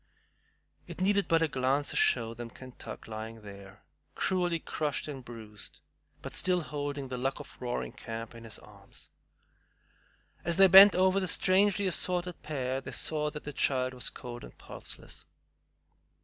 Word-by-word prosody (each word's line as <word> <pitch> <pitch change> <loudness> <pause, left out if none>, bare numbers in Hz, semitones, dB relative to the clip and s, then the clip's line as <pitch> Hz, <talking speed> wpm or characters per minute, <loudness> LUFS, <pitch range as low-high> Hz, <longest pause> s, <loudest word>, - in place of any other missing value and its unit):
It - - -8
needed 200 +1 +2
but 165 0 +4
a - - +3
glance 135 +1 +1
to - - -6
show 430 - +3
them 120 0 -7
Kentuck 130 +1 -10
lying 110 0 -7
there, 100 -1 -12 0.3
cruelly 180 -2 +1
crushed 155 -2 -2
and 135 -3 -6
bruised, 110 -4 -10 0.4
but - - -6
still 180 -1 +1
holding 145 -3 -4
The 125 -1 -4
Luck 135 +3 -1
of 145 - -10
Roaring 125 -1 -2
Camp 115 0 -6
in 115 0 -11
his 115 -2 -6
arms. - - -14 1.3
As 170 0 0
they 195 - +9
bent 195 +2 +10
over 190 +1 +4
the 185 - -1
strangely 195 +3 +3
assorted 180 -1 0
pair, 135 -3 -2
they - - -7
saw 150 -1 0
that 150 0 -8
the 150 - -6
child 130 -1 +1
was 125 - -2
cold 120 -1 -8
and - - -12
pulseless. - - -7
145 Hz, 160 wpm, -30 LUFS, 120-180 Hz, 1.3 s, bent